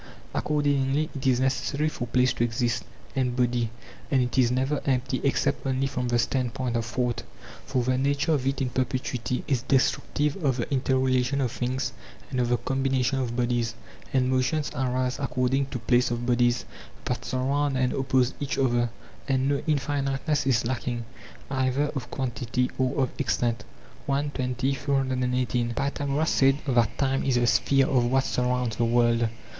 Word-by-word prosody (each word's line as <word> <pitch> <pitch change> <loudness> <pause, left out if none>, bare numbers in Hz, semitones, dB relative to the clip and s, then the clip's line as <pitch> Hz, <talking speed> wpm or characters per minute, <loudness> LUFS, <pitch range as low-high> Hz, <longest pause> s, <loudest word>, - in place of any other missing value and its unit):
Accordingly 145 0 +1
it 135 0 -2
is 125 -2 +3
necessary 140 +3 0
for 125 -5 -3
place 125 +2 +3
to - - 0
exist, 120 -1 0 0.3
and 125 -2 0
body; 120 -2 +1 0.4
andit 125 -3 +1
is 120 -2 +4
never 135 +3 0
empty 130 -1 0
except 140 - +1
only 130 0 +1
from 125 -2 -2
the 120 0 +2
standpoint 125 0 -1
of 115 -1 0
thought, 120 0 -1 0.5
for 125 -2 0
the 130 +1 +1
nature 140 +3 +1
of 135 -4 +1
it 135 0 0
in 125 - -2
perpetuity 125 -1 -2
is 130 -4 +1
destructive 145 +5 +1
of 135 -3 +2
the 120 - -2
interrelation 130 0 +1
of 130 -4 0
things 130 +2 -2 0.4
and 130 - -1
of 120 -1 +1
the 120 - +3
combination 135 0 0
of 120 -2 -2
bodies; 120 -1 0 0.4
and 130 -1 +2
motions 130 +4 +1
arise 130 0 -1
according 135 0 0
to 140 - -4
place 120 +2 +2
of 120 0 -2
bodies 120 -3 +2 0.4
that 125 0 -2
surround 135 +2 0
and 125 -1 +1
oppose 130 -1 +1
each 140 - -2
other; 120 -3 +2 0.4
and 130 0 +1
no 140 0 +1
infiniteness 145 -1 0
is 120 -2 +2
lacking, 120 -1 -2 0.5
either 135 +2 +1
of 130 -3 -4
quantity 125 -1 -2
or 130 +1 +1
of 130 - -2
extent. 120 -4 0 0.4
i. 140 +1 +2
20; 130 -1 -1
318. 130 -3 0
Pythagoras 140 +2 0
said 135 0 +4
that 120 -4 +2
time 135 -1 +1
is 130 - +1
the 120 0 +3
sphere 135 +3 +3
of 125 -2 +2
what 130 +2 +2
surrounds 125 -3 0
the 120 - +2
world. 115 -1 +3
130 Hz, 165 wpm, -26 LUFS, 125-135 Hz, 0.5 s, is